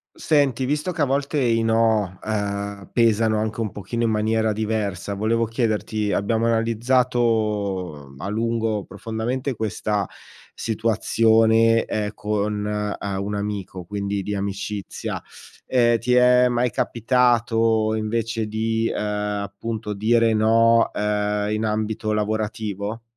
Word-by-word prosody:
Senti, 140 Hz, -5 st, +1 dB
visto 150 Hz, +6 st, -1 dB
che 165 Hz, -3 st, -1 dB
a -, -, +5 dB
volte 140 Hz, +2 st, -1 dB
i 115 Hz, -3 st, +2 dB
no, 110 Hz, -4 st, +2 dB
uhm, 100 Hz, -1 st, -3 dB
pesano 110 Hz, -2 st, +3 dB
anche 110 Hz, +1 st, -2 dB
un 110 Hz, -3 st, -1 dB
pochino 105 Hz, +4 st, -4 dB
in 115 Hz, -, +2 dB
maniera 110 Hz, +1 st, +1 dB
diversa, 105 Hz, -3 st, -2 dB
volevo 115 Hz, +3 st, +1 dB
chiederti: 110 Hz, -2 st, -1 dB
abbiamo 115 Hz, +3 st, +1 dB
analizzato, 110 Hz, -, 0 dB
mhmm, 70 Hz, +1 st, -15 dB
a 100 Hz, -, -3 dB
lungo, 110 Hz, -1 st, -1 dB
profondamente, 115 Hz, +6 st, -3 dB
questa 105 Hz, -2 st, -2 dB, 0.5 s
situazione, 115 Hz, 0 st, +3 dB
ehm, 105 Hz, -1 st, -2 dB
con, 105 Hz, 0 st, -2 dB, 0.3 s
uhm, 100 Hz, -1 st, -3 dB
un 105 Hz, +1 st, -3 dB
amico, 100 Hz, -3 st, -4 dB
quindi 100 Hz, +1 st, -3 dB
di 105 Hz, -, -3 dB
amicizia; 100 Hz, +1 st, -4 dB, 0.4 s
ehm, 120 Hz, -2 st, +3 dB
ti 125 Hz, +2 st, +1 dB
è 125 Hz, 0 st, +5 dB
mai 120 Hz, 0 st, +1 dB
capitato 115 Hz, -2 st, +2 dB
invece 110 Hz, 0 st, -1 dB
di, 110 Hz, +1 st, -1 dB
ehm, -, -, -4 dB, 0.5 s
appunto, 105 Hz, +2 st, -5 dB
dire 115 Hz, +2 st, +3 dB
no, 115 Hz, +1 st, +4 dB
uhm, 105 Hz, 0 st, 0 dB
in 110 Hz, +1 st, -1 dB
ambito 110 Hz, 0 st, -1 dB
lavorativo? 105 Hz, 0 st, -2 dB
110 Hz, 125 wpm, -23 LUFS, 105-115 Hz, 0.5 s, a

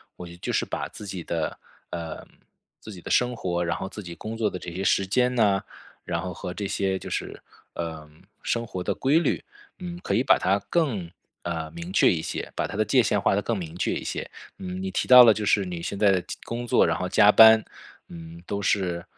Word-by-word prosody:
我 90 Hz, -, -9 dB
觉 85 Hz, -, -11 dB
得 85 Hz, -, -15 dB
就 -, -, -3 dB
是 -, -, 0 dB
把 -, -, -4 dB
自 105 Hz, -, -11 dB
己 95 Hz, -3 st, -6 dB
的 80 Hz, -1 st, -3 dB, 0.3 s
呃， 85 Hz, -2 st, -6 dB, 0.5 s
自 110 Hz, -, -11 dB
己 90 Hz, -4 st, -10 dB
的 -, -, -7 dB
生 125 Hz, 0 st, +2 dB
活， 90 Hz, -5 st, -2 dB
然 85 Hz, -, -1 dB
后 -, -, -5 dB
自 105 Hz, -, -8 dB
己 85 Hz, -3 st, -9 dB
工 110 Hz, +5 st, -6 dB
作 110 Hz, -2 st, 0 dB
的 90 Hz, -, -6 dB
这 90 Hz, -1 st, -8 dB
些 95 Hz, +3 st, -4 dB
时 100 Hz, -, +2 dB
间 125 Hz, +6 st, +1 dB
呐， 100 Hz, -5 st, +2 dB, 0.4 s
然 85 Hz, -1 st, -2 dB
后 90 Hz, -1 st, -4 dB
和 90 Hz, +2 st, -7 dB
这 100 Hz, -, -3 dB
些 95 Hz, -1 st, -1 dB
就 -, -, -9 dB
是， -, -, -5 dB, 0.3 s
呃， 80 Hz, -2 st, -6 dB, 0.3 s
生 115 Hz, 0 st, -1 dB
活 95 Hz, -5 st, -5 dB
的 -, -, -1 dB
规 140 Hz, +5 st, +3 dB
律， 170 Hz, -, -1 dB, 0.3 s
嗯， 175 Hz, -1 st, -7 dB
可 -, -, -1 dB
以 120 Hz, -, +2 dB
把 -, -, +5 dB
它 95 Hz, +2 st, +2 dB
更， 125 Hz, -, 0 dB, 0.3 s
呃， 80 Hz, -2 st, -4 dB
明 85 Hz, +2 st, -8 dB
确 95 Hz, -, +4 dB
一 80 Hz, -, -1 dB
些， -, -, -5 dB
把 -, -, -1 dB
它 -, -, -7 dB
的 110 Hz, -, +3 dB
界 130 Hz, +4 st, +4 dB
线 105 Hz, -2 st, +1 dB
划 95 Hz, -, +2 dB
得 100 Hz, -, +1 dB
更 115 Hz, +1 st, -2 dB
明 85 Hz, -3 st, -7 dB
确 -, -, 0 dB
一 -, -, -4 dB
些。 -, -, -5 dB, 0.3 s
嗯， 90 Hz, 0 st, -5 dB
你 95 Hz, 0 st, -3 dB
提 -, -, -2 dB
到 125 Hz, -1 st, +10 dB
了 115 Hz, -2 st, +7 dB
就 105 Hz, -, -4 dB
是 100 Hz, 0 st, +2 dB
你 90 Hz, -2 st, -5 dB
现 100 Hz, -, -4 dB
在 100 Hz, 0 st, +4 dB
的 95 Hz, -2 st, +1 dB, 0.2 s
工 120 Hz, +1 st, -5 dB
作， -, -, +4 dB
然 85 Hz, -, 0 dB
后 90 Hz, -1 st, -3 dB
加 105 Hz, +3 st, +6 dB
班， 110 Hz, 0 st, +8 dB, 0.5 s
嗯， 85 Hz, 0 st, -10 dB
都 100 Hz, +2 st, -3 dB
是， 90 Hz, -4 st, 0 dB
95 Hz, 260 characters per minute, -25 LUFS, 85-110 Hz, 0.5 s, 到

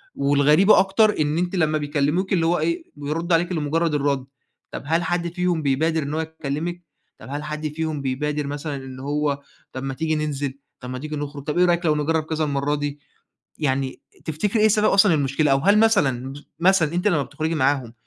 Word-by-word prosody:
والغريبة 145 Hz, +8 st, +4 dB
أكتر 195 Hz, +2 st, +3 dB
إن 150 Hz, +1 st, +1 dB
أنتِ 180 Hz, +2 st, -1 dB
لما 155 Hz, -3 st, +2 dB
بيكلموكِ، 150 Hz, +6 st, 0 dB
اللي 170 Hz, -3 st, +2 dB
هو 170 Hz, +2 st, +2 dB
إيه، 340 Hz, 0 st, -1 dB
بيردوا 160 Hz, +4 st, -1 dB
عليكِ 175 Hz, +2 st, -2 dB
لمجرد 160 Hz, 0 st, 0 dB
الرد. 140 Hz, -2 st, 0 dB, 0.5 s
طَب -, -, -6 dB
هل 165 Hz, +3 st, +1 dB
حد 170 Hz, 0 st, -2 dB
فيهم 180 Hz, -2 st, 0 dB
بيبادر 155 Hz, +3 st, +1 dB
إن 140 Hz, +1 st, -4 dB
هو 155 Hz, -, -1 dB
يكلمِك؟ 160 Hz, +2 st, -4 dB, 0.4 s
طَب -, -, -12 dB
هل 145 Hz, +2 st, -4 dB
حد 150 Hz, 0 st, -4 dB
فيهم 155 Hz, -2 st, -3 dB
بيبادر 145 Hz, +2 st, -2 dB
مثلًا 145 Hz, +1 st, -4 dB
إن 130 Hz, -1 st, -8 dB
هو، 145 Hz, +1 st, -1 dB, 0.3 s
طَب 130 Hz, -, -5 dB
ما 135 Hz, 0 st, -3 dB
تيجي 160 Hz, +3 st, -1 dB
ننزل، 145 Hz, -3 st, -2 dB, 0.3 s
طَب 125 Hz, -, -8 dB
ما 130 Hz, 0 st, -5 dB
تيجي 155 Hz, +2 st, -5 dB
نخرج، 145 Hz, -1 st, -5 dB
طَب 150 Hz, +3 st, -3 dB
إيه 180 Hz, -, +5 dB
رأيِك 175 Hz, 0 st, +1 dB
لو 155 Hz, -2 st, +3 dB
نجرّب 155 Hz, +2 st, 0 dB
كذا 155 Hz, 0 st, -2 dB
المرّة 145 Hz, 0 st, 0 dB
دي. 145 Hz, 0 st, -4 dB, 0.6 s
يعني 135 Hz, -3 st, -1 dB, 0.2 s
تفتكري 200 Hz, +8 st, 0 dB
إيه 215 Hz, -, +6 dB
سبب 215 Hz, 0 st, +3 dB
أصلًا 195 Hz, -2 st, +5 dB
المشكلة، 140 Hz, 0 st, +1 dB
أو 135 Hz, -, +4 dB
هل 200 Hz, +8 st, +4 dB
مثلًا، 135 Hz, -, +2 dB, 0.3 s
مثلًا 175 Hz, -3 st, +3 dB
أنتِ 180 Hz, +4 st, 0 dB
لما 165 Hz, -8 st, +2 dB
بتخرجي 160 Hz, +4 st, -3 dB
معاهم 135 Hz, -5 st, 0 dB
150 Hz, 195 wpm, -23 LUFS, 140-170 Hz, 0.6 s, إيه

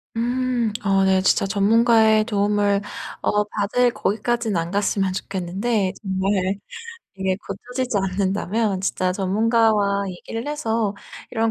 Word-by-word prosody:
음. 245 Hz, 0 st, 0 dB
어 195 Hz, -1 st, +3 dB
네 190 Hz, 0 st, +3 dB
진짜 190 Hz, -, +3 dB
전문가의 220 Hz, +2 st, +4 dB
도움을 205 Hz, -2 st, +1 dB, 0.4 s
어 210 Hz, 0 st, +2 dB
받을 215 Hz, +4 st, +1 dB
거기까지는 225 Hz, +1 st, -1 dB
안 165 Hz, +1 st, -2 dB
갔으면 200 Hz, -1 st, 0 dB
좋겠는데 190 Hz, +2 st, -2 dB
정말 190 Hz, -1 st, 0 dB, 0.6 s
이게 190 Hz, -1 st, 0 dB
고쳐지지 250 Hz, +3 st, -3 dB
않는다면 195 Hz, +2 st, -1 dB
진짜 185 Hz, -1 st, 0 dB
전문가와 205 Hz, +1 st, +2 dB
얘기를 225 Hz, +6 st, -6 dB
해서 225 Hz, -8 st, -1 dB, 0.4 s
'이런 225 Hz, -1 st, +1 dB
205 Hz, 275 characters per minute, -22 LUFS, 195-225 Hz, 0.6 s, 전문가의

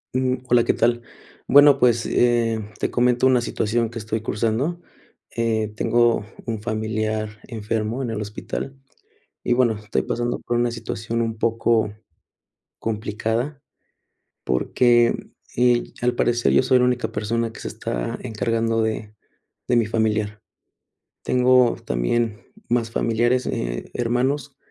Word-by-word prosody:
Ujú, 130 Hz, 0 st, 0 dB
hola, 120 Hz, -1 st, +4 dB
¿qué -, -, +2 dB
tal? 120 Hz, 0 st, +2 dB, 0.5 s
Bueno, 145 Hz, 0 st, +7 dB
pues, 120 Hz, -2 st, +3 dB
eh, 120 Hz, -2 st, +2 dB, 0.2 s
te -, -, -1 dB
comento 125 Hz, +1 st, +2 dB
una 130 Hz, -2 st, +4 dB
situación 115 Hz, 0 st, -1 dB
que 120 Hz, -, -8 dB
estoy 110 Hz, 0 st, -3 dB
cursando. 115 Hz, +10 st, -1 dB, 0.6 s
Eh, 110 Hz, -2 st, 0 dB
tengo 120 Hz, 0 st, +2 dB, 0.2 s
un 110 Hz, -3 st, -3 dB
familiar 110 Hz, -1 st, -2 dB
enfermo 110 Hz, +2 st, -3 dB
en 120 Hz, -, -3 dB
el 110 Hz, -1 st, -3 dB
hospital. 110 Hz, +5 st, -5 dB, 0.7 s
Y, 120 Hz, -, +2 dB
bueno, 120 Hz, -2 st, +3 dB
estoy 105 Hz, 0 st, -2 dB
pasando 120 Hz, 0 st, -2 dB
por 120 Hz, -, -2 dB
una 120 Hz, 0 st, +1 dB
situación 115 Hz, 0 st, -3 dB
un 115 Hz, -1 st, -2 dB
poco 115 Hz, -1 st, +1 dB, 0.9 s
complicada, 115 Hz, +5 st, -2 dB, 0.8 s
porque, 120 Hz, -, +2 dB, 0.3 s
eh, 120 Hz, 0 st, +3 dB, 0.2 s
al 120 Hz, 0 st, +1 dB
parecer 120 Hz, 0 st, +2 dB
yo -, -, +4 dB
soy 130 Hz, 0 st, +4 dB
la -, -, +3 dB
única 125 Hz, 0 st, -1 dB
persona 115 Hz, +1 st, -1 dB
que -, -, -11 dB
se -, -, -4 dB
está -, -, -4 dB
encargando 115 Hz, 0 st, 0 dB
de 110 Hz, -1 st, -3 dB, 0.6 s
de 120 Hz, -, +3 dB
mi 115 Hz, -, +3 dB
familiar. 105 Hz, -2 st, -1 dB, 0.8 s
Tengo 125 Hz, -1 st, +4 dB
también 105 Hz, -, 0 dB, 0.3 s
más 115 Hz, -1 st, 0 dB
familiares, 120 Hz, +3 st, +1 dB
eh, -, -, -3 dB
hermanos, 130 Hz, +4 st, -1 dB
115 Hz, 135 wpm, -22 LUFS, 110-120 Hz, 0.9 s, Bueno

